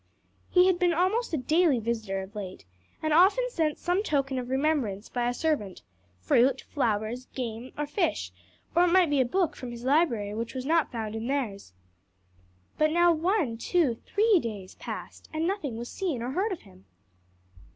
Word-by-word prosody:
He 360 0 +5
had 370 -2 +3
been 355 -1 +3
an - - -3
almost 370 - 0
daily 320 -4 +4
visitor 220 -4 -2
of 190 +2 -12
late, 190 - -7 0.4
and 310 -1 +1
often 395 +10 +5
sent 315 -7 0
some 355 +3 0
token 275 -8 0
of 250 0 -6
remembrance 265 -7 0
by 245 -1 0
a - - 0
servant 245 - -2 0.4
fruit, 245 - +3
flowers, 235 -1 -2
game 240 0 -5
or 295 - -1
fish, 295 - -1 0.4
or 350 +1 +6
it 350 - +2
might 360 -4 +4
be 285 -2 +3
a - - +2
book 355 +6 0
from 250 - -7
his 240 0 -8
library 255 -8 +2
which 230 +3 -4
was 255 0 -4
not 325 +1 +2
found 220 -3 -4
in 225 +1 -4
theirs. 225 - -3 1.1
But 310 0 +4
now 345 +2 +4
one, 325 - 0
two, 325 -3 +2
three 415 - +2
days 205 -8 -6
passed - - -8
and 315 +1 -1
nothing 325 - -2
was 235 +1 -5
seen 315 -10 -3
or 250 - -3
heard 390 +9 0
of 370 - -4
him. 190 -1 -19
270 Hz, 180 wpm, -28 LUFS, 230-340 Hz, 1.1 s, or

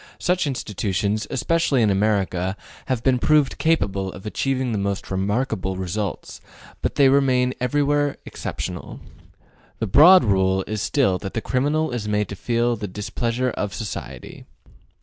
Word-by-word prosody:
Such 180 -3 0
institutions, 105 -4 -2
especially 140 -1 +1
in 105 - +3
America, 95 -2 0 0.3
have 125 -3 -1
been 130 -2 +3
proved 150 0 +2
capable 100 -12 0
of 95 - -12
achieving 130 +3 -1
the 105 - -1
most 100 -1 -3
remarkable 95 -1 -1
results, 95 +1 -4 0.4
but - - -2
they 140 - +5
remain 130 -2 +3
everywhere 145 +2 +1
exceptional. - - -6 0.8
The 115 - -2
broad 160 - +7
rule 95 -2 +2
is 110 -1 -3
still 110 -11 +1
that 95 - -7
the - - +1
criminal 145 +6 0
is 115 -4 -3
made 105 0 0
to 100 - -5
feel 120 +4 0
the 105 -2 -5
displeasure 115 +5 -2
of 105 -3 -4
society. 110 -4 -7
115 Hz, 145 wpm, -22 LUFS, 100-135 Hz, 0.8 s, broad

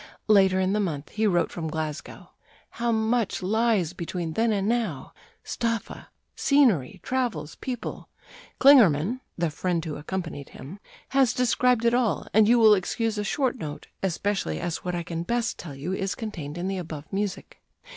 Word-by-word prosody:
Later 190 -3 +5
in 190 +1 +1
the 210 - +1
month 155 -7 -3
he 215 0 0
wrote 175 -3 +1
from 165 -2 -4
Glasgow: 155 -1 -5 0.4
"How 235 0 -1
much 220 -2 0
lies 210 -4 +1
between 170 -1 -4
then 225 +4 +2
and 200 -1 0
now!... 220 - -2 0.3
Staffa 230 -1 -3 0.3
scenery, 240 - +3
travels, 235 - -2
people: 250 -3 -6 0.5
Klingerman 235 - +6 0.2
[the 170 -2 0
friend 175 +1 -1
who 155 -2 -4
accompanied 160 -2 -5
him] 155 +10 -10 0.3
has 270 -3 +3
described 250 -1 +2
it 235 - +4
all, 240 -4 +1
and 215 0 +5
you 240 - +6
will 220 -2 +7
excuse 215 +3 -1
a - - -1
short 260 +2 -1
note, 150 -4 -6 0.2
especially 190 - -1
as 170 - -2
what 180 -1 -4
I 170 - -2
can 165 0 -4
best 235 +6 -1
tell 150 -5 -8
you 150 +7 -4
is 195 0 -2
contained 170 -9 -6
in 175 +2 -3
the 195 -1 -2
above 155 -4 -7
music." 200 -1 -4
195 Hz, 165 wpm, -26 LUFS, 165-230 Hz, 0.5 s, will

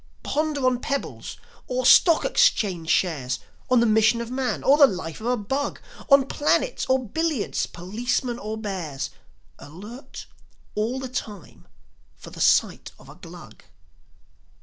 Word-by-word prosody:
Ponder 300 -3 -1
on 250 -1 +2
pebbles 280 +1 -4 0.3
or - - -2
stock 335 -3 +6
exchange 190 - +2
shares, 135 -8 0 0.3
On 255 -1 +4
the - - +3
mission 220 +1 +3
of 235 0 -6
man 255 -1 -2
or 275 - +5
the 290 -2 +7
life 180 - -6
of 225 - -4
a 250 0 +1
bug, 265 +7 -3 0.3
On 275 -1 +6
planets 300 - 0
or 260 -2 +1
billiards, 320 0 -1
policemen 235 +7 -3
or 215 0 -5
bears, 160 -11 -5 0.5
Alert 205 - -11 0.5
all 230 +5 -2
the 265 - -5
time 205 - -8 0.5
for - - -13
the - - -8
sight - - +2
of - - -17
a - - -12
Glug. - - -13
235 Hz, 145 wpm, -24 LUFS, 195-270 Hz, 0.5 s, the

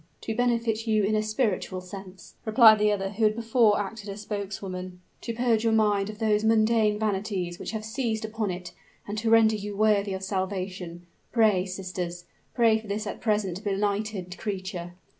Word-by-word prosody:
"To 225 - -3
benefit 230 -2 0
you 215 -1 +3
in 205 +2 +1
a 215 - +2
spiritual 215 -4 -1
sense," 185 -1 -11
replied 220 -1 +7
the 210 - +3
one 205 -2 0
who 215 +2 -2
had 215 0 +4
before 230 -2 +3
acted 205 +1 -5
as 200 +1 -6
spokeswoman: 190 -3 -5 0.2
"to 235 - -4
purge 230 -1 +1
your 225 -1 +2
mind 210 -2 +2
of 210 - -7
those 215 -1 +1
mundane 220 -1 +3
vanities 195 -4 -2
which - - -5
have 215 -1 -4
seized 220 -2 -2
upon 220 -1 -2
it, 180 -1 -6 0.3
and 205 - -4
to 225 +1 0
render 225 -1 +5
you 205 -1 -5
worthy 205 -2 +2
of 190 - -6
salvation. 185 -2 -4 0.3
Pray, 210 -6 +3
sisters 180 -2 -5 0.3
pray 230 -3 +4
for 220 - -13
this 210 +2 -3
at 210 - -6
present 210 -4 0
benighted 200 -2 -2
creature!" 185 -4 -4
210 Hz, 180 wpm, -27 LUFS, 190-220 Hz, 0.3 s, replied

